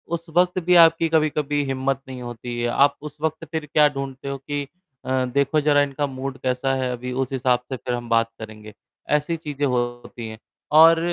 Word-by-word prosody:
उस 170 0 -8
वक़्त 180 +1 +3
भी 180 0 +4
आपकी 165 0 +1
कभी-कभी 150 -2 +1
हिम्मत 135 0 -1
नहीं 130 -1 -8
होती 120 0 -6
है। 120 - +1
आप 140 +3 +3
उस 150 0 -9
वक़्त 160 +1 -2
फिर 160 -2 -3
क्या 150 -1 +6
ढूँढते 135 -1 -6
हो 140 - -3
कि 140 +1 -4 0.6
देखो 140 +3 +2
ज़रा 145 -1 +4
इनका 145 0 -1
मूड 135 0 -5
कैसा 130 +1 0
है 125 - -1
अभी 125 +1 -5
उस 130 - -8
हिसाब 130 -2 +1
से 130 - -2
फिर 125 +2 -4
हम 120 -1 -5
बात 115 0 +2
करेंगे। 110 -1 -10 0.4
ऐसी 155 +3 -3
चीज़ें 145 -3 -3
होती 120 -2 -3
हैं 110 0 -8 0.4
और 165 0 +7
135 Hz, 195 wpm, -23 LUFS, 125-150 Hz, 0.6 s, और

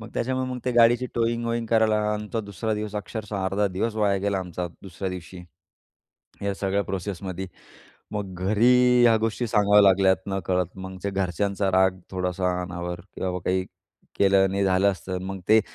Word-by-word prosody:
मग 115 - -9
त्याच्यामुळे 130 +1 -1
मग 125 - -4
ते 125 - 0
गाडीची 120 +1 +4
टोइंग-वोइंग 115 0 -1
करायला 110 -1 +3 0.2
आमचा 105 +2 -3
दुसरा 105 +1 -3
दिवस 105 0 -5
अक्षरशः 105 +1 -5
अर्धा 100 +2 +1
दिवस 110 +4 -1
वाया 100 -2 +2
गेला 100 0 0
आमचा 90 -1 -4 0.2
दुसऱ्या 95 0 -5
दिवशी. 90 0 -8 1.0
या 100 -1 -1
सगळ्या 100 +1 0
प्रोसेसमध्ये. 95 0 -4 0.7
मग 100 -3 -4
घरी 125 +4 +4
ह्या 115 -2 +6
गोष्टी 115 +2 -1
सांगाव्या 105 -1 +5
लागल्यात 95 -1 +5
नकळत. 95 -2 -1
मग 95 0 -8
जे 100 - -1
घरच्यांचा 95 +1 -1
राग 95 0 +3
थोडासा 90 -1 -1
अनावर 90 -1 -5
की 90 +2 -15
बाबा 90 -1 -1
काही 95 0 +1 0.5
केलं 100 -1 +5
आणि 100 +1 0
झालं 95 +1 +3
असतं. 95 0 -5
मग 95 0 -5
ते 110 +1 +7
100 Hz, 165 wpm, -25 LUFS, 95-110 Hz, 1.0 s, ते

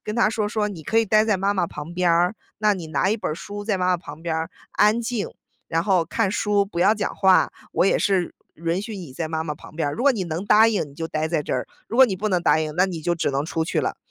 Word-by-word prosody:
跟 210 - -4
他 225 -2 +3
说， 215 -2 -1
说 210 -1 0
说： - - -2
“你 160 -4 -10
可 225 - -1
以 225 - +5
呆 215 +1 +4
在 215 -3 +2
妈 195 +2 +1
妈 185 -3 0
旁 165 +2 -8
边 180 0 +1
儿， 175 +4 +3 0.2
那 210 -1 +3
你 180 -4 -5
拿 160 +5 0
一 220 - +1
本 190 -7 -3
儿 - - -4
书 205 +4 -7
在 210 -3 0
妈 180 0 0
妈 180 - +3
旁 165 -2 -11
边 170 - -2
儿， 160 0 -3 0.2
安 210 +3 +3
静， 230 -3 -2 0.4
然 165 0 +1
后 185 -5 +3
看 190 +3 0
书， 205 -2 +1
不 175 -3 -4
要 205 +4 +5
讲 205 - -3
话， 190 -2 +4 0.2
我 - - +3
也 - - +3
是 190 -3 0 0.2
允 170 +3 -2
许 215 -1 -6
你 170 -9 -8
在 160 +4 -3
妈 160 0 -2
妈 150 -2 -3
旁 155 - -14
边 155 -3 0
儿， - - -3
如 240 - -4
果 280 -1 +5
你 195 -6 -3
能 170 +3 -4
答 215 +2 +6
应， 220 -3 0
你 - - -16
就 165 +1 -4
待 155 +1 -1
在 155 -3 0
这 - - -4
儿， 125 - -2 0.2
如 230 - -4
果 265 - +9
你 195 - -2
不 215 +3 -1
能 180 -3 +1
答 155 - +4
应， 155 -1 -3
那 185 - +5
你 175 -4 -5
就 175 +2 0
只 165 - -1
能 140 +2 -1
出 160 0 -1
去 165 - 0
了。” - - -2
185 Hz, 325 characters per minute, -23 LUFS, 165-210 Hz, 0.4 s, 果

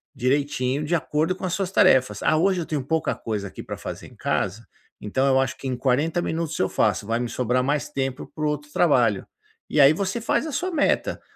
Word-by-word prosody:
direitinho, 135 +1 0
de 170 +3 +1
acordo 160 +2 0
com 185 - -6
as 180 - -2
suas 195 -2 -1
tarefas. 130 - +3
"Ah, 155 - +3
hoje 185 +1 +2
eu - - -4
tenho 150 -3 -2
pouca 160 +2 0
coisa 105 -3 -4
aqui - - -9
pra - - -6
fazer - - -7
em - - -17
casa, 100 +4 -2 0.4
então 130 +6 0
eu 135 -1 +4
acho 135 0 -2
que 135 - -6
em 130 - -1
40 145 +7 +1
minutos 165 -2 -2
eu - - +1
faço. - - +1
Vai 115 +1 0
me 120 - -2
sobrar 125 +1 0
mais 145 +2 -1
tempo 135 0 -4
para 155 - -3
o - - +2
outro 150 0 -3
trabalho", 125 - +2 0.4
e 150 - +3
aí 140 +1 +8
você 195 +6 -2
faz 235 +5 0
a - - -4
sua 370 +6 -1
meta. 315 -4 0
145 Hz, 225 wpm, -24 LUFS, 125-165 Hz, 0.4 s, aí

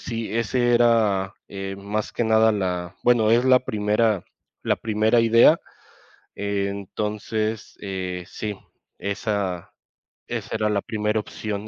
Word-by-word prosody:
sí, 115 -3 -4
ese 120 +1 +2
era, 110 -5 +3
eh, 95 0 -6
más 105 +2 -3
que 120 - -1
nada 110 0 +4
la 90 -3 -2
bueno, 115 -3 +4
es 120 +2 +4
la 130 -1 +6
primera, 105 -1 +1 0.4
la - - +2
primera 110 +1 +2
idea. 115 +8 +6 0.7
Entonces, 105 +2 -3
eh, 95 -2 -4
sí, 105 0 -5 0.4
esa, 100 -3 -3 0.6
esa - - -4
era 105 -1 +1
la 100 -1 +1
primera 105 0 -1
opción. 105 0 -5
105 Hz, 125 wpm, -23 LUFS, 100-115 Hz, 0.7 s, la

